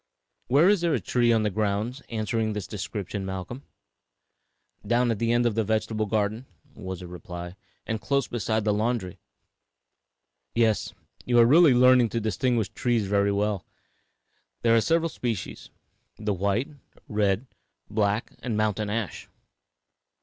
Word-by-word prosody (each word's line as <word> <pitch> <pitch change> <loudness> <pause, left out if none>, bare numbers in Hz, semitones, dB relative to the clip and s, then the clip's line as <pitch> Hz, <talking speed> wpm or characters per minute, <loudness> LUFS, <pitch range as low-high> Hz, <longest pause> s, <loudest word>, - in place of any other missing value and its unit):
Where 145 +7 +5
is 205 -3 +4
there 170 -3 +2
a - - 0
tree 120 +4 +2
on 110 -1 +3
the 105 - 0
grounds 105 +6 -1
answering 110 -1 -1
this 105 -3 -4
description, 100 0 -5
Malcolm?" 95 +7 -5 1.2
"Down 120 0 +2
at 110 - -2
the 115 0 +1
end 120 0 +2
of 120 - +2
the 110 +1 +1
vegetable 110 0 -1
garden," 110 +4 -1 0.3
was 95 -5 -7
the 90 - -8
reply, 90 0 -8 0.3
"and 110 -1 -3
close 140 -1 0
beside 110 -2 -1
the 105 - +2
laundry." 105 -4 -1 1.4
[Illustration: - - -6
AMERICAN 120 - +5
WHITE 115 - +5
ASH.] 105 - -4
"Yes; - - -19
you 120 -1 +3
are 115 - +8
really 150 +3 +6
learning 125 -1 +6
to 115 - -1
distinguish 115 +1 0
trees 120 -4 0
very 100 +1 +2
well. 100 -1 0 1.0
There 115 -1 +5
are 115 - +5
several 165 +5 +2
species 115 - -4 0.5
the 105 -1 -1
white, 100 +7 0 0.4
red, 105 +2 +1 0.4
black 105 +1 0
and 115 -3 -2
mountain 105 -1 0
ash. 105 -2 -4
110 Hz, 155 wpm, -26 LUFS, 100-120 Hz, 1.4 s, are